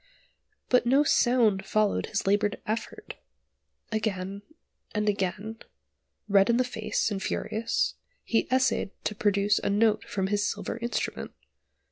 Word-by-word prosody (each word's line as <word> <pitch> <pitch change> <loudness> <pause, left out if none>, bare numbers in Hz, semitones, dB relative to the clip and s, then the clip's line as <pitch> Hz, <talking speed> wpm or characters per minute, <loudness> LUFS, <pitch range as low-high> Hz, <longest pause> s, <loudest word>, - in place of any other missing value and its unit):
But 250 -1 +3
no 275 +4 +5
sound 235 -8 +3
followed 210 +1 +1
his 215 - -2
laboured 205 +1 +1
effort! 220 +2 -5 0.7
Again, 200 -3 -2 0.5
and 210 0 0
again, 205 +2 -2 0.7
red 200 0 +4
in 235 - +4
the 255 - +3
face, 220 -3 -2
and 195 -1 -3
furious, 220 +3 -1 0.3
he 225 - +1
essayed 260 -5 +2
to - - -1
produce 205 -1 +2
a - - -2
note 215 +1 +2
from 190 -2 -2
his 205 +1 0
silver 215 - -3
instrument. 235 0 -3
210 Hz, 130 wpm, -27 LUFS, 200-230 Hz, 0.7 s, no